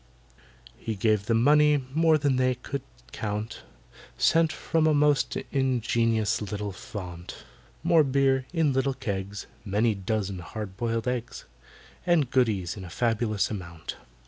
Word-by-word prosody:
He 110 - -3
gave 105 0 +1
them 115 0 +3
money, 150 -1 +4
more 160 0 +4
than 140 -3 +1
they 130 0 +2
could 135 +3 -5 0.3
count, 105 0 -4 0.6
Scent 165 -1 +3
from 160 0 0
a 155 - +4
most 145 -2 +2
ingenious 115 -5 +1
little 105 0 -4
fount, 90 -2 -8 0.4
More 165 -2 +5
beer, 135 -1 +2
in 160 -5 +2
little 135 0 +1
kegs, 100 -2 -4 0.2
Many 110 +2 +1
dozen 100 -1 -2
hard 100 +2 -7
boiled 115 +2 -2
eggs, 125 -1 -3 0.6
And 165 -7 +2
goodies 105 -9 +1
to 100 - -8
a 90 - -8
fabulous 110 0 0
amount. 85 -6 -6
115 Hz, 135 wpm, -27 LUFS, 105-140 Hz, 0.6 s, More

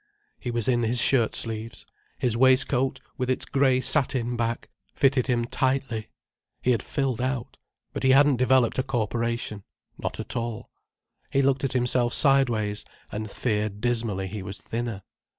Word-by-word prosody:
He 125 - -5
was 120 -2 -1
in 120 -2 +2
his 120 +1 +1
shirt 120 -2 +4
sleeves. 115 0 -3 0.3
His 120 -3 0
waistcoat, 130 +1 +3 0.2
with 125 0 -1
its 130 - 0
grey 135 -2 +2
satin 130 -4 0
back, 115 0 -3 0.2
fitted 135 -2 +2
him 120 -2 +1
tightly. 130 -4 -1 0.5
He 125 - +3
had 115 - +1
filled 135 -5 -2
out—but 130 -2 -6
he 130 - +3
hadn't 140 0 +5
developed 130 -1 +3
a - - +2
corporation. 115 -3 -2 0.4
Not - - -4
at - - -5
all. 115 -2 -4 0.6
He 135 - +2
looked 135 0 +2
at 135 - -1
himself 125 -1 +2
sideways, 120 -8 +2 0.3
and 110 0 -4
feared 105 -2 -2
dismally 115 -4 0
he 105 +1 -6
was 95 +1 -6
thinner. 115 -4 -4
120 Hz, 150 wpm, -26 LUFS, 115-130 Hz, 0.6 s, hadn't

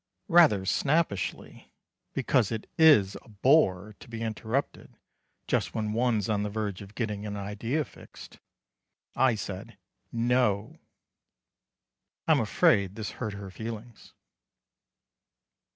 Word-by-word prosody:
Rather 155 - +5
snappishly 140 - -1 0.4
because 120 -5 +1
it 110 -1 -4
is 145 -12 +6
a - - -20
bore 105 - +2
to - - -13
be 115 -1 -5
interrupted 115 +4 -3 0.5
just - - -1
when 110 -1 -2
one's 115 -3 +1
on 105 -2 0
the 105 - -2
verge 105 -2 -4
of 100 +1 -12
getting 105 -4 -3
an 105 -1 -5
idea 110 +9 -2
fixed - - -14 0.8
I 130 -3 +3
said 100 -3 -7 0.3
"No." 115 -3 0 1.5
I'm - - +5
afraid 100 -1 +2
this 110 -2 -5
hurt 110 -4 -2
her 100 -1 -8
feelings. 115 +2 -8
110 Hz, 115 wpm, -28 LUFS, 100-120 Hz, 1.5 s, is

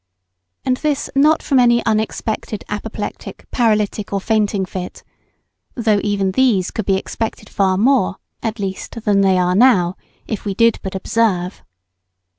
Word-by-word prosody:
And 255 -1 +1
this 295 -1 -1
not 300 +3 +3
from 270 -3 +2
any 240 -1 +4
unexpected 220 0 -2
apoplectic, 210 0 -6
paralytic, 215 -3 0
or 200 - 0
fainting 205 -1 0
fit 185 -1 -7 0.7
(though 220 -4 +2
even 200 -2 0
these 210 -5 +2
could 220 - -4
be 195 - +3
expected 215 +1 -4
far 190 -2 +1
more, 235 -3 +3 0.3
at 225 0 -3
least, 200 +2 -5
than 200 -2 +3
they 190 -1 +3
are 180 0 +2
now, 190 -5 +4 0.3
if 215 - -4
we 200 -2 -3
did 230 +1 +3
but 190 -1 -6
observe). 190 -3 0
210 Hz, 145 wpm, -19 LUFS, 195-230 Hz, 0.7 s, any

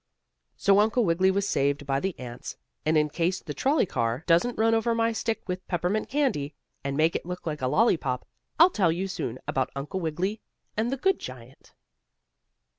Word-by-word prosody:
So 200 0 +4
Uncle 220 +2 +3
Wiggily 180 +2 +3
was 200 +1 +1
saved 140 +1 0
by 135 -1 +1
the 190 +3 -3
ants, 125 -1 -8 0.3
and 155 0 +4
in 150 0 +3
case 170 +4 -1
the 150 - -7
trolley 275 - +2
car 115 -3 -1
doesn't 180 +8 +3
run 225 +1 +3
over 230 +1 +2
my 230 0 +2
stick 225 -1 -3
of 185 0 -4
peppermint 180 +4 -1
candy, 200 - 0 0.3
and 140 0 -2
make 160 +2 +3
it - - -1
look 180 +1 -6
like 150 -3 -3
a 130 - +1
lolly 215 - +4
pop, 125 -4 -3 0.3
I'll 345 +3 +8
tell 185 - +2
you 180 +4 -2
soon 130 -10 -4
about 130 -1 0
Uncle 145 +8 -4
Wiggily 185 +6 -2 0.3
and 225 +3 0
the 270 - -1
good 380 +7 +2
giant. 130 0 -11
180 Hz, 190 wpm, -27 LUFS, 145-220 Hz, 0.3 s, I'll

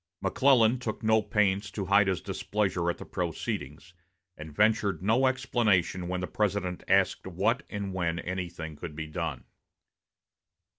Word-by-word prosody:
McClellan 125 -3 +4
took 115 -3 -5
no 110 0 +4
pains 100 -1 +1
to 100 0 -4
hide 100 +1 +4
his 95 -2 0
displeasure 95 -5 -1
at 85 - -2
the - - -9
proceedings, 85 -2 -4 0.4
and 75 0 -9
ventured 105 0 +2
no 115 +6 +3
explanation 100 -8 +1
when 90 0 -2
the 90 - -3
President 100 -4 -1
asked - - +2
what - - 0
and 100 -2 -4
when 85 -3 -1
anything 85 -3 -5
could 75 +1 -8
be 80 0 -4
done. 80 -4 -4
95 Hz, 145 wpm, -28 LUFS, 85-105 Hz, 0.4 s, McClellan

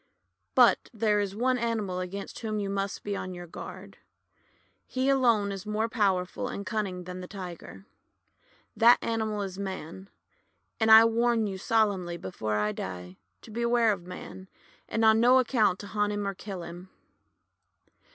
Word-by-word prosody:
"But - - +5
there 215 -3 +1
is 200 -1 -2
one 250 +3 +1
animal 220 -6 -1
against 190 +2 -6
whom 215 -2 -3
you 200 -1 -2
must 195 0 -3
be 205 -1 -3
on 185 -1 -5
your 175 0 -8
guard. 170 - -10 0.9
He 260 +1 0
alone 235 -7 +3
is 195 -1 -6
more 215 +1 0
power 200 -6 +1
ful 180 - -5
and 200 - -5
cunning 195 -4 -3
than 180 +1 -7
the 180 - -8
Tiger. 175 - -9 0.9
That 235 +2 +7
animal 220 -2 -1
is 190 -1 -6
Man. 190 -1 -6 0.7
And 220 -1 +2
I 220 +1 +10
warn 230 0 +2
you 195 -2 -4
solemnly, 195 -5 +1
before 110 -12 -4
I 105 0 +1
die, 90 -2 -7 0.3
to - - -12
beware 235 0 +2
of 180 -3 -5
Man, 185 +1 -9 0.4
and 225 0 +1
on 220 0 +6
no 245 +3 +6
account 230 -7 +2
to - - -8
hunt 210 0 -1
him 205 -1 -2
or 200 - -2
kill 190 -2 -7
him." 175 +2 -10
200 Hz, 165 wpm, -28 LUFS, 185-225 Hz, 0.9 s, I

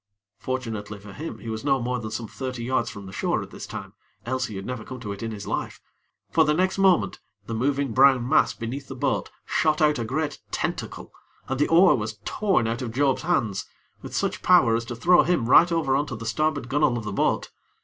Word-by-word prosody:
Fortunately 110 -5 -4
for 100 0 -12
him 160 +3 -6
he 115 - -8
was 110 0 -5
no 135 -2 +2
more 125 +1 -2
than 110 -2 -5
some 110 +1 -4
thirty 130 0 -5
yards 130 +2 0
from 100 -3 -9
the 95 - -9
shore - - -1
at - - -12
this - - -8
time, - - -7 0.3
else 130 +1 -1
he 105 - -8
had 95 0 -6
never 125 -3 -5
come 130 +3 -8
to 105 -4 -6
it 100 - -7
in 115 - -3
this 105 -2 -7
life; - - -3 0.5
for 160 - +5
the 150 0 +2
next 185 +3 +1
moment 190 -3 +3 0.3
the 115 - -5
moving 135 +3 0
brown 130 -1 +5
mass 155 - +4
beneath 130 +5 -6
the 135 - -7
boat 125 - -1 0.2
shot 155 -1 +1
out 150 -2 +3
a - - -1
great 145 +5 -3
tentacle - - -4 0.3
and 130 0 -2
the 150 - +3
oar 175 +3 +6
was 110 -2 -4
torn 195 - +1
out 115 +2 -2
of 120 -3 -4
Job's 135 +2 +1
hands 115 - 0 0.3
with - - -8
such - - -1
power 170 -11 +5
as 115 0 -2
to 120 - -5
throw 175 +9 +5
him 155 -10 +1
right 170 +7 +6
over 155 -5 +1
on 145 +2 0
to 120 - -5
the 115 +1 -8
starboard 150 +3 0
gunnel 140 -2 +2
of 115 - -5
the 105 -2 -4
boat. - - 0
130 Hz, 230 wpm, -25 LUFS, 115-150 Hz, 0.5 s, oar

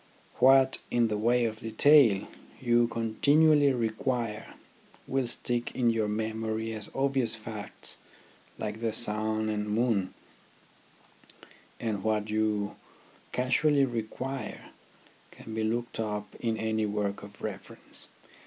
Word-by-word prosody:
What, 135 0 +5
in 120 -2 +2
the 105 - -1
way 120 +2 +3
of 110 -1 -3
detail, 115 -2 +5 0.3
you 120 -1 +3
continually 145 +6 +3
require 115 -2 -2 0.5
will 135 -2 -1
stick 120 0 -1
in 120 -2 +3
your 110 -2 0
memory 110 +1 -2
as 105 -2 -4
obvious 135 -4 +1
facts 110 -2 -4 0.6
like 110 - -4
the 115 -1 -1
sun 110 -1 0
and 105 -1 -2
moon; 105 -4 0 1.6
and 105 -4 -2
what 110 -1 0
you 105 -1 0 0.5
casually 135 +3 +3
require 125 +3 -5 0.6
can 110 - -11
be 110 0 -1
looked 115 +1 -2
up 105 -2 -3
in 115 -1 -1
any 110 -1 0
work 105 -1 -2
of 100 0 -12
reference. 100 -3 -3
110 Hz, 115 wpm, -29 LUFS, 110-120 Hz, 1.6 s, What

